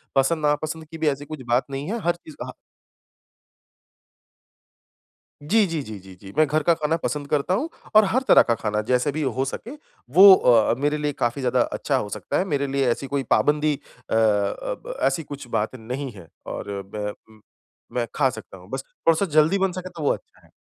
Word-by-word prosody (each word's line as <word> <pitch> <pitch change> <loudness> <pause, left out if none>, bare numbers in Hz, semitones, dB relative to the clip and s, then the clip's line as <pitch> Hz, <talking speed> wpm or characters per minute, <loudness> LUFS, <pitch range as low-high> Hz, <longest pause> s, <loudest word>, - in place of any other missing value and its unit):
पसंद 150 +3 +2
ना 150 - +4
पसंद 160 0 -4
की 165 - -7
भी 160 -1 -1
ऐसी 140 +1 -4
कुछ 150 -2 -8
बात 120 +2 +2
नहीं 140 +6 -4
है 235 - -2
हर 175 0 +2
चीज़ 160 -3 -14
हा - - -7 2.9
जी, 205 +7 +3
जी, 165 -3 -3
जी, 110 -5 -8
जी, 95 0 -13
जी। 95 -1 -11
मैं 155 0 +5
घर 155 +2 0
का 170 +2 +4
खाना 160 0 0
पसंद 145 -1 -2
करता 150 +5 +1
हूँ 280 +11 -1 0.3
और 215 - +9
हर 230 +7 +1
तरह - - +8
का 115 - +1
खाना 105 -1 -2
जैसे 125 +3 +2
भी 155 +2 -3
हो 130 -1 0
सके 210 - -6 0.4
वो 195 +3 +10
अ, 115 -7 +4
मेरे 150 +2 0
लिए 150 0 -1
काफ़ी 120 0 -1
ज़्यादा 125 0 +2
अच्छा 135 +3 0
हो 105 - -2
सकता - - -3
है। - - +1
मेरे 145 -6 -1
लिए 135 0 0
ऐसी 135 +3 -2
कोई 140 0 -1
पाबंदी 150 0 +3 0.4
अ, - - 0
अब 115 - 0
ऐसी 165 - +1
कुछ 145 -3 -9
बात 110 +1 -1
नहीं 130 +4 -5
है 95 -6 -13 0.2
और 100 -1 -5
बैं 105 +1 -5
उम, 110 +1 -17 0.5
मैं 120 -1 -1
खा 140 -3 +3
सकता 110 -4 -10
हूँ 90 0 -15
बस 135 0 -4
थोड़ा-सा 165 +4 +1
जल्दी 160 +6 +2
बन 190 -1 +1
सके 185 0 -6
तो 170 -3 -8
वो 145 - +2
अच्छा - - -11
है। - - -23
145 Hz, 210 wpm, -23 LUFS, 120-160 Hz, 2.9 s, वो